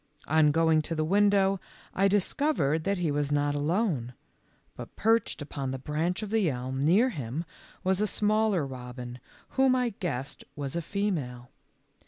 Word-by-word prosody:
On 155 0 +4
going 160 +1 +3
to 165 +2 -4
the 155 0 0
window 195 +1 +3 0.3
I 195 +1 +3
discovered 195 - +1
that 200 0 +1
he 170 -4 0
was 145 0 -1
not 145 0 +1
alone, 145 - -1 0.6
but - - -9
perched 225 -7 +1
upon 140 -2 -5
the 130 - -3
branch 160 - -2
of 210 - -6
the 215 -6 +2
elm 130 +1 -3
near 200 - +4
him 145 - -4 0.4
was 190 +1 +1
a 210 - +2
smaller 210 -5 +2
robin, 125 -1 -8 0.3
whom 265 -1 +3
I 250 -1 +1
guessed 150 - -4
was 140 -1 -4
a 170 - 0
female. 155 -11 -3
160 Hz, 160 wpm, -28 LUFS, 140-200 Hz, 0.6 s, On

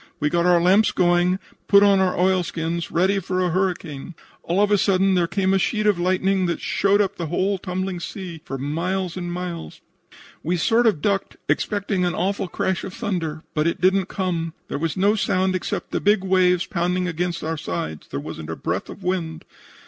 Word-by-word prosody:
We 150 0 0
got 170 0 +2
our 175 -1 +5
lamps 190 +5 +4
going, 175 -1 +3
and 190 - -3 0.3
put 200 0 +7
on 200 -1 +5
our 190 -1 +1
oilskins, 170 -2 0
ready 190 +3 +2
for 185 0 -2
a 180 -2 +1
hurricane. 175 -4 -2 0.3
All 175 +3 -1
of 205 0 +3
a 205 - +5
sudden 195 0 +3
there 175 -2 +2
came 195 0 +1
a 195 - +3
sheet 215 +2 0
of 205 -4 +3
lightning 185 +1 +1
that 170 - -1
showed 200 +1 +2
up 200 0 -1
the 170 - -3
whole 190 +4 0
tumbling 185 0 -3
sea 170 -2 -7
for 135 - -5
miles 170 +6 -2
and 175 -1 -4
miles. 175 -2 -5 0.6
We 175 +3 -1
sort 230 +7 +3
of 165 -9 +1
ducked, 200 -1 -1
expecting 200 -2 0
an 175 - 0
awful 195 0 -1
crash 190 +1 -2
of 190 - -7
thunder, 175 -9 -3
but 155 +1 +1
it 170 - -1
didn't 190 +1 +3
come. 170 -4 -2
There - - -3
was 165 +3 -2
no 200 +3 +4
sound 190 -3 +1
except 185 - -3
the - - -1
big 205 -1 +3
waves 185 -1 +3
pounding 180 +1 -1
against 175 0 -2
our 160 +1 -2
sides. 85 - -5
There 70 - -4
wasn't - - -7
a - - -3
breath - - -3
of 200 - -10
wind. 170 -3 -2
180 Hz, 200 wpm, -22 LUFS, 170-195 Hz, 0.6 s, put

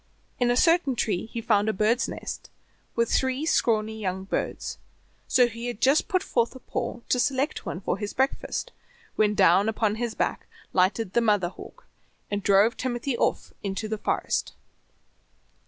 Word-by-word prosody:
In 245 -1 +3
a 245 - +2
certain 330 -5 +3
tree 215 -4 -1
he 230 +1 -5
found 210 -1 +2
a - - +1
bird's 215 +5 +2
nest, - - -6 0.5
with 235 -1 +1
three 260 +3 +1
scrawny 220 -7 +1
young 190 -2 -3
birds, 195 - -3 0.5
so 250 -1 +5
he 230 +1 -6
had 240 -3 -5
just 275 +5 +3
put 370 0 +1
forth 235 +1 0
a - - -9
paw 240 - -4
to 250 - +2
select 275 +3 0
one - - -3
for 190 - -2
his 205 -1 -3
breakfast, 265 +1 -1 0.4
when 210 -1 +2
down 190 +2 +5
upon 220 -1 0
his 235 -2 -2
back - - -2 0.3
lighted 190 +2 +1
the 235 - +3
mother 205 -6 +2
hawk, - - -13 0.5
and 205 0 -1
drove 200 +4 +4
Timothy 250 +1 -2
off - - -1
into 200 +2 -3
the 215 0 -3
forest. - - -1
225 Hz, 170 wpm, -26 LUFS, 205-245 Hz, 0.5 s, so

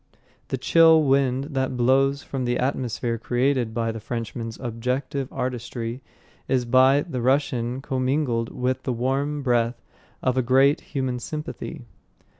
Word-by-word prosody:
The 135 - -2
chill 160 +3 +5
wind 135 0 +1
that 130 -2 -1
blows 135 +3 +3
from 130 -2 -4
the 120 0 0
atmosphere 120 -3 -1
created 125 0 0
by 115 0 -1
the 115 - -6
Frenchman's 115 0 -5
objective 125 +3 -3
artistry 125 -1 -4 0.5
is 130 -2 +1
by 130 +4 +5
the 135 -8 -4
Russian 130 -1 0
commingled 130 -3 0
with 130 +1 -2
the 130 - -2
warm 135 +4 -1
breath 120 -2 +1 0.4
of 130 0 +1
a - - +4
great 135 +4 +4
human 130 -3 -3
sympathy. 150 - -6
130 Hz, 135 wpm, -24 LUFS, 120-135 Hz, 0.5 s, chill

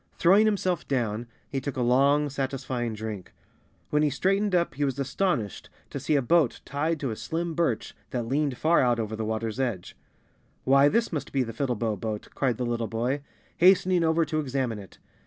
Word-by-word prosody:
Throwing 200 +5 +5
himself 185 -5 0
down, 120 -3 -1 0.2
he 135 -2 -3
took 135 0 -5
a 125 - +1
long, 140 +4 +3
satisfying 130 -4 -3
drink. 105 -3 -6 0.6
When 150 - +3
he 150 - +3
straightened 195 +7 +1
up 170 -1 +1
he 145 - -2
was 135 -2 -1
astonished 140 - -1 0.2
to 140 - -4
see 145 +3 0
a 140 - +2
boat 155 -2 +3
tied 155 +3 -1
to 135 -5 -1
a - - -3
slim 165 +10 -3
birch 140 -9 -1
that 120 -2 -2
leaned 140 +1 0
far 160 +7 +3
out 120 -2 +2
over 110 -1 -3
the 110 - -3
water's 110 +1 -3
edge. 120 -9 -2 0.4
" - - -39
Why, 140 +2 +5
this 230 0 0
must 150 - -3
be 135 -2 +1
the 115 -1 -6
Fiddlebow 115 -4 -1
Boat," 110 -1 -4
cried 125 -5 0
the 125 - -2
little 120 -1 -1
boy, 120 +6 -1 0.4
hastening 185 -1 +5
over 160 0 +2
to 155 +1 -1
examine 130 -6 -2
it. 95 -3 -13
135 Hz, 195 wpm, -27 LUFS, 115-160 Hz, 0.6 s, Throwing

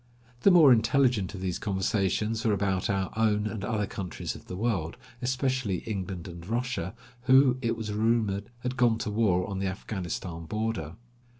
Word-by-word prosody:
The - - +6
more 160 -8 +8
intelligent 115 -4 +2
of 95 - -7
these 90 -2 -2
conversations 105 +2 0
were 110 -3 +2
about 95 -2 0
our 95 -1 -1
own 105 -2 +2
and 110 -2 -4
other 105 -1 0
countries 95 -3 -5
of - - -12
the 90 - -5
world, 95 -6 -1 0.2
especially 130 -6 -1
England 95 -4 -4
and 85 -1 -9
Russia, 115 -4 -2 0.3
who, 130 0 +5
it 115 -2 0
was 110 -2 -4
rumored, 105 -2 +1
had 125 +1 -3
gone 120 -3 +4
to 110 -2 -3
war 100 -5 +2
on 100 -1 -4
the 95 - -1
Afghanistan 90 -3 -5
border. 105 -6 -3
105 Hz, 170 wpm, -28 LUFS, 95-115 Hz, 0.3 s, more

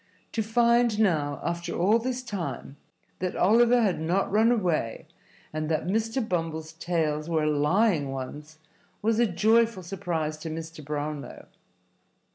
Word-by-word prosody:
To 225 - -1
find 235 0 +3
now, 150 -9 +1
after 170 0 -3
all 205 +7 +3
this 255 +1 -3
time, 195 - -5 0.4
that 185 0 -2
Oliver 235 +4 +4
had 195 -6 +1
not 180 +5 0
run 220 +3 +4
away, 175 - 0 0.5
and 155 0 -2
that 155 -1 0
Mr. 225 +5 -1
Bumble's 160 -3 -3
tales 160 -2 -1
were 160 -2 +1
lying 150 +2 +2
ones, 150 +4 -7 0.5
was 225 +1 +2
a 240 - +4
joyful 220 +2 +2
surprise 170 -4 -3
to 160 - -6
Mr. 160 0 -7
Brownlow. 150 0 -5
175 Hz, 135 wpm, -27 LUFS, 155-220 Hz, 0.5 s, Oliver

